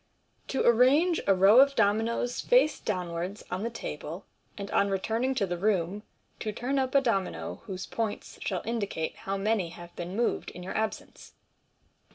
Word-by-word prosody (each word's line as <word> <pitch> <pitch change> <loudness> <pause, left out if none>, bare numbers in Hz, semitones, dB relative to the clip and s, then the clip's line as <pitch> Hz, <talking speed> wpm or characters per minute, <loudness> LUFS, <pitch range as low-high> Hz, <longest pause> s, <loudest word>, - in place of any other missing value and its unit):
to 265 - -1
arrange 275 +9 +4
a 195 - +5
row 195 +6 +7
of 275 +1 +6
dominoes 225 +3 +1
face - - +3
downwards 180 0 -3
on 185 - -2
th1 235 - -2
Table, 165 +3 -6 0.3
and 200 -1 -6
on 200 - +2
returning 225 +7 0
to 215 -6 +1
the 175 -2 -4
Room 195 -1 0 0.4
to 215 - -3
turn 255 +6 -1
up 260 +1 -1
a 275 - +7
Domino 200 -7 -2
whose 190 -3 -5
points 225 -2 -4
shall 185 -3 -2
indicate 200 -8 -2
how 195 +1 -4
many 200 -3 0
have 175 0 -12
been 175 +2 -5
moved 235 +2 0
in 180 - -10
tour 185 - -6
absence. 220 0 -4
205 Hz, 170 wpm, -28 LUFS, 185-235 Hz, 0.4 s, row